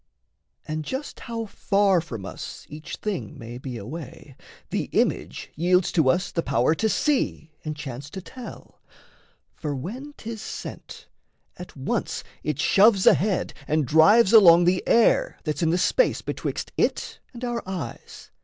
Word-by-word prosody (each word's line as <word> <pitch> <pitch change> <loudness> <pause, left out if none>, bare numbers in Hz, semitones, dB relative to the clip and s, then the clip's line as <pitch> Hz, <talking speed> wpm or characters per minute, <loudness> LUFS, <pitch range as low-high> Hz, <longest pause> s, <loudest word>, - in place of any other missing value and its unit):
And 155 0 -3
just 265 - -5
how 230 -1 -5
far 200 -3 +2
from 115 - -7
us - - -8
Each 150 +1 -8
thing 180 - -4
may 120 +1 -8
be 130 -2 -6
away, 135 +3 -9 0.4
the - - -1
image - - -1
yields 180 +3 +2
To 160 -6 +3
us 180 +8 +1
the 165 - 0
power 125 0 +2
to 220 +7 0
see 250 - 0
and 155 -1 -4
chance 140 -1 -7
to 190 - -7
tell: 245 +6 -11 0.7
For 150 -2 -4
when 245 - -6
'tis 225 -1 -7
sent, - - -8 0.5
at 180 - -10
once 130 - -2 0.2
it 150 -2 -2
shoves 195 +3 +5
ahead 195 -2 +3
And 155 -1 +1
drives 195 - +5
along 175 -6 +8
the 180 +1 +2
air 235 - +3
that's 150 -1 -2
in 165 - +2
the 170 - +2
space - - +2
Betwixt - - -4
it - - -1
and 245 0 -10
our 240 -1 -2
eyes. 165 -11 -7
175 Hz, 155 wpm, -25 LUFS, 150-215 Hz, 0.7 s, along